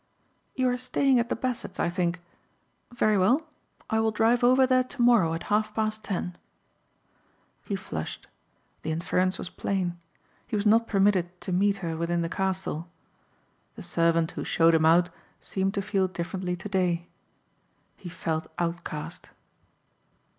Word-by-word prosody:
"You 260 -1 +1
are 245 0 -1
staying 260 0 +2
at 235 - -1
the - - 0
Bassetts 255 -2 -4
I - - +2
think. 175 0 -1 0.7
Very 215 -4 +2
well 250 - +3 0.4
I 220 - +1
will 220 0 +2
drive 225 +3 +2
over 255 +2 +6
there 255 0 +3
tomorrow 240 -10 +3
at 165 - -5
half 215 0 +1
past 215 0 -1
ten." 180 -2 -3 1.3
He 200 - -2
flushed. 80 - -6 0.6
The 160 - -3
inference 180 +3 0
was 180 - -6
plain. 180 -3 -2 0.5
He 225 - -3
was 205 0 -1
not 225 +2 +4
permitted 190 -3 +2
to 190 - -5
meet 200 +2 +2
her 165 -1 -2
within 170 +1 -1
the 165 - -2
castle. 190 -3 -2 0.9
The 210 - -9
servant 165 -1 +1
who - - -5
showed 165 0 +3
him 160 -1 +4
out 175 +2 +4 0.3
seemed 195 +1 -2
to 200 - -1
feel 195 -2 +1
differently 180 +1 -3
today. 180 -2 -1 0.9
He 180 - -9
felt 160 -2 -3
outcast. 170 -3 -4
190 Hz, 145 wpm, -27 LUFS, 170-220 Hz, 1.3 s, over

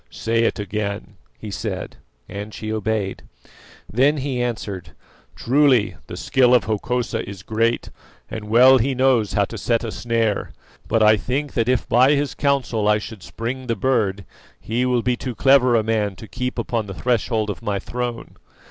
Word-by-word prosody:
"Say 115 0 0
it - - 0
again," 105 -1 -4 0.2
he 105 - -8
said, 100 - -5 0.3
and 100 +2 -7
she 110 0 -4
obeyed. 110 -2 -2 0.7
Then 135 +7 +2
he 130 -3 -2
answered: 100 -9 -4 0.4
"Truly 130 -4 +3
the - - -7
skill 125 -1 +3
of 125 - +3
Hokosa 115 +2 -1
is 95 -2 -9
great, 115 +3 0 0.4
and 110 -1 -6
well 130 +4 +7
he 130 +3 0
knows 125 -5 +2
how 100 - +2
to 115 +2 -8
set 115 +3 0
a 115 - -3
snare; 115 -3 -1 0.3
but 115 - +2
I 110 0 +6
think 135 +7 -3
that 115 0 0
if 125 -2 +1
by 130 +5 +5
his 145 0 0
counsel 130 -7 0
I 105 0 +4
should 105 -1 -8
springe 125 +6 -5
the 115 - 0
bird, 105 -5 0 0.3
he 120 +3 -1
will 125 -2 +1
be 125 -1 +1
too 125 -1 -5
clever 130 -2 +5
a 110 - +3
man 105 -3 0
to 110 - -11
keep 125 +3 -4
upon 115 -2 -2
the 95 - -7
threshold 115 -3 0
of 100 - -8
my 100 -1 -1
throne. 120 +3 -5
115 Hz, 175 wpm, -21 LUFS, 105-125 Hz, 0.7 s, well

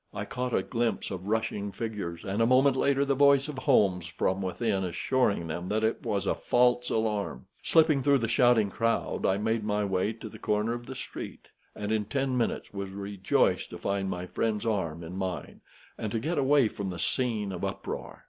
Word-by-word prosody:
I - - -3
caught 125 0 -3
a - - +1
glimpse 120 -1 -1
of 95 0 -6
rushing 105 -2 -1
figures, 105 -6 -5
and 100 +3 -1
a 115 - +4
moment 130 +2 +5
later 140 +1 +2
the 140 - +2
voice 140 0 +5
of 145 -3 -5
Holmes 95 - +3
from 95 +3 -1
within 95 +1 -1
assuring 95 +2 0
them 85 +3 -4
that 110 +2 0
it 110 - +1
was 100 -1 -1
a - - +2
false 125 0 +2
alarm. 105 -4 -1 0.2
Slipping 155 -4 +4
through 140 +1 +4
the 115 -3 -1
shouting 115 -3 +4
crowd, 115 +2 0
I 95 - +2
made 110 +1 0
my 105 0 0
way 95 +2 0
to 110 0 -9
the - - -11
corner 105 +2 0
of 120 0 -7
the 130 - -6
street, - - -8 0.3
and 105 +1 -3
in 110 -1 +1
ten 135 +2 -1
minutes 120 -4 -1
was 100 -1 -4
rejoiced 100 0 0
to - - -7
find 100 -1 -1
my 90 -1 -3
friend's 110 +3 -1
arm 85 -7 -1
in 85 +2 -7
mine, 95 -2 -4 0.4
and 110 - -3
to 115 - +1
get 155 +6 -1
away 140 -2 +4
from 100 -2 -5
the 90 - -5
scene 110 0 -1
of 90 - -6
uproar. - - -5
110 Hz, 205 wpm, -28 LUFS, 95-125 Hz, 0.4 s, moment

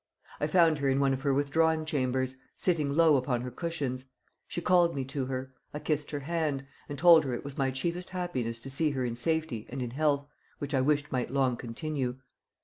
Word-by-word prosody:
I - - +1
found 165 -5 +4
her 140 -1 +1
in 135 +1 +2
one 135 -1 +3
of 135 - -3
her 140 0 +1
withdrawing 155 +3 +2
chambers, 130 -3 0 0.2
sitting 160 -6 +1
low 155 0 +5
upon 125 -2 0
her 125 0 -5
cushions. 135 -4 -3 0.4
She - - -4
called 175 -1 +3
me 135 -1 -2
to 135 -1 -3
her; 130 0 -4 0.2
I - - -1
kissed 150 -1 -1
her 145 -1 -4
hand, 150 -3 -1 0.2
and 145 - -5
told 165 +1 +7
her 130 -3 -2
it - - -6
was 140 -1 -7
my 135 -1 +1
chiefest 170 +7 -3
happiness 130 -11 -3
to 135 - -7
see 155 +3 +1
her 130 -3 -1
in 120 - -2
safety 135 -2 -1
and 135 - -5
in 125 -2 -3
health, 145 +1 +1 0.3
which 145 +1 -5
I 135 - +3
wished 145 +1 +1
might 125 -3 -1
long 130 -2 +2
continue. 125 +2 -3
140 Hz, 215 wpm, -29 LUFS, 130-160 Hz, 0.4 s, told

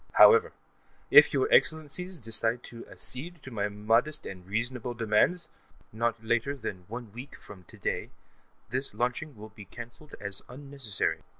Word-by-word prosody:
However, 455 0 +7 0.6
if - - +9
your 410 - +2
Excellencies 180 - +2
decide 115 -1 0
to 115 -1 -10
accede 160 +5 -7
to 130 - -9
my 105 -3 -1
modest 115 +8 +1
and 90 -1 -8
reasonable 120 +4 -2
demands, 115 +10 +2 0.5
not 115 0 -1
later 120 +5 +1
than 100 -8 -6
one 115 -2 -7
week 125 +5 -9
from 95 -3 -13
today, - - -3 0.6
this 130 +2 0
test - - -14
launching 125 +3 -2
will 110 +1 -9
be 105 0 -12
cancelled 120 +8 -10
as 100 -1 -1
unnecessary. 135 -5 -3
120 Hz, 145 wpm, -29 LUFS, 110-140 Hz, 0.6 s, if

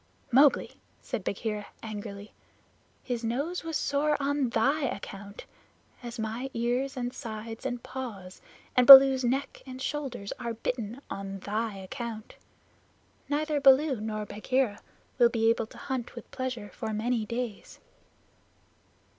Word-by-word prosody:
"Mowgli," 275 +3 +4 0.2
said 245 -7 -5
Bagheera 210 +1 -3 0.2
angrily, 210 -1 -7 0.7
"his 245 -2 -3
nose 280 +11 -2
was 325 -2 -2
sore 295 +1 +1
on 280 -2 0
thy 280 +6 +2
account, 200 -3 -7 0.6
as 240 -1 -7
my 225 +4 -3
ears 245 +4 -1
and 245 0 -3
sides 225 +1 -6
and 245 -2 -5
paws, 210 -8 -7 0.3
and 250 -1 +4
Baloo's 270 -1 +11
neck 265 +3 -1
and 260 -1 -9
shoulders 265 -7 -4
are 235 -2 -4
bitten 235 +1 -4
on 195 0 -5
thy 215 +1 -2
account. 220 +3 -7 1.0
Neither 300 0 0
Baloo 270 -2 +5
nor 215 -1 -3
Bagheera 220 +2 -1 0.4
will 240 -1 +6
be 225 -1 +3
able 230 -1 -1
to - - -15
hunt 255 -3 -4
with 235 - -10
pleasure 250 -5 -4
for 220 - -4
many 225 +2 0
days." 235 -2 -5
240 Hz, 130 wpm, -28 LUFS, 215-265 Hz, 1.0 s, Baloo's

